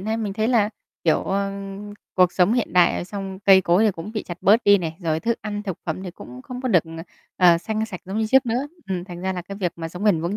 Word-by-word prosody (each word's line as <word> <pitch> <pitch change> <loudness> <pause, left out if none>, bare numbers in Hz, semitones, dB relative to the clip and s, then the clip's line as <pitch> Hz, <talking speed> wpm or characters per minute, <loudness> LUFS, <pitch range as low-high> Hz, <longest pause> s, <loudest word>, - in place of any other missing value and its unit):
nay 220 +3 -2
mình 210 -3 -3
thấy 220 +2 0
là, 220 -4 +3 0.4
kiểu, 160 - +3
ờ, 195 +1 -1 0.6
cuộc 180 -1 +4
sống 185 +4 +3
hiện 245 - 0
đại, 180 -1 +5
ờ, - - -3
xong 195 -1 -6
cây 195 -1 +6
cối 180 +4 +3
thì 215 - +4
cũng 180 +4 -8
bị 215 - -3
chặt 175 0 -8
bớt 215 +5 +5
đi 205 0 +6
này, 165 -3 -4
rồi 160 -2 -1
thức 230 0 -1
ăn 210 -1 -4
thực 190 -5 -5
phẩm 165 +4 -3
thì 185 - -6
cũng 125 -6 -11
không 250 - -7
có 255 - -2
được, 175 -7 +4
ờ, 165 0 -8 0.3
ờ, 175 -2 +6
xanh, 220 +3 -2
sạch 185 -5 -8
giống 195 +4 -4
như 220 - +1
trước 265 +3 +4
nữa, 250 +5 -1 0.2
ừm, 180 -2 -2
thành 175 -2 -9
ra 190 +1 -1
là 180 - -5
cái 195 +3 -8
việc 180 -4 -2
mà 165 -1 -5
sống 180 +4 -7
bền 200 -7 +3
vững 175 +5 -2
195 Hz, 285 wpm, -23 LUFS, 175-215 Hz, 0.6 s, cây